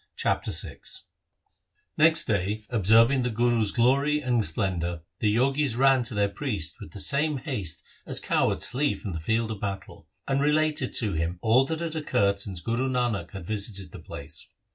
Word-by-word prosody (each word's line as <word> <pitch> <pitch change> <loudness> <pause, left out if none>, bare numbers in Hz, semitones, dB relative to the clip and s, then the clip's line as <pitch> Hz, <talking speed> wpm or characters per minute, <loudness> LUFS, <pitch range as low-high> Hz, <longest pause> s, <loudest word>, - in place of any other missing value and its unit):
Chapter - - 0
VI - - -2 1.2
Next 160 0 +5
day, 105 +1 -1
observing 115 +4 +5
the 125 - 0
Guru's 115 -2 +2
glory 140 +6 +3
and 125 -5 +1
splen 95 -5 -1
dour, 85 0 -3 0.2
the 105 -2 +2
Jogis 135 +1 +2
ran 135 -1 +4
to 115 - -2
their 100 0 +2
priest 100 - -3
with - - -8
the 100 - -9
same 150 +5 0
haste 95 - -2 0.2
as - - +2
cowards 90 - +1
flee 140 +6 0
from 100 - -6
the 80 - -4
field 110 +7 0
of 105 - -5
battle, 100 -1 -6 0.2
and 135 0 +1
related 150 -2 +1
to 105 -5 +1
him 85 +2 -2
all 120 +4 +4
that 160 +3 -3
had 165 -1 -3
occurred 100 -10 +1
since 95 -3 -4
Guru 120 +5 -1
Nanak 120 -5 -1
had 95 -4 -8
visited 100 -1 -2
the - - -9
place. 70 - -8
115 Hz, 180 wpm, -26 LUFS, 100-135 Hz, 1.2 s, Next